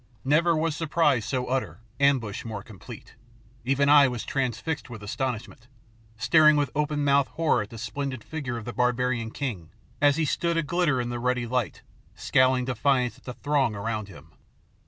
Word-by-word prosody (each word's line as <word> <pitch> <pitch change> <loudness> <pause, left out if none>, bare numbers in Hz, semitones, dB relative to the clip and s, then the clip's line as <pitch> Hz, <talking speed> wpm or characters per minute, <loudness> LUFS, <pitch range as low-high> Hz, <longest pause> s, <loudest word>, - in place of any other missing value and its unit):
Never 165 +5 +3
was 160 -1 0
surprise 150 -6 +1
so 130 -2 -2
utter, 130 -3 -2 0.2
ambush 135 -7 +1
more 110 -3 -6
complete. 105 -5 -12 0.5
Even 135 +3 +1
I 145 -1 +7
was 125 -3 -4
transfixed 135 +3 -2
with 115 -3 -9
astonishment, 120 +1 -4 0.5
staring 155 +5 +5
with 145 -1 0
open 150 0 -1
mouthed 140 -1 +3
horror 165 -8 +2
at 105 - -6
the 115 - -10
splendid 130 +1 -4
figure 135 -7 -5
of 115 - -7
the 120 - -5
barbarian 125 -2 0
king 110 - -5 0.3
as 145 -1 +5
he 160 +1 0
stood 170 +3 0
aglitter 165 -3 +1
in 120 -1 -2
the 120 0 -4
ruddy 125 0 0
light, 125 -1 -2 0.3
scowling 130 -1 +2
defiance 125 -1 0
at - - -28
the 125 - -6
throng 140 -6 0
around 110 0 -3
him. 80 -4 -14
130 Hz, 170 wpm, -26 LUFS, 120-145 Hz, 0.5 s, I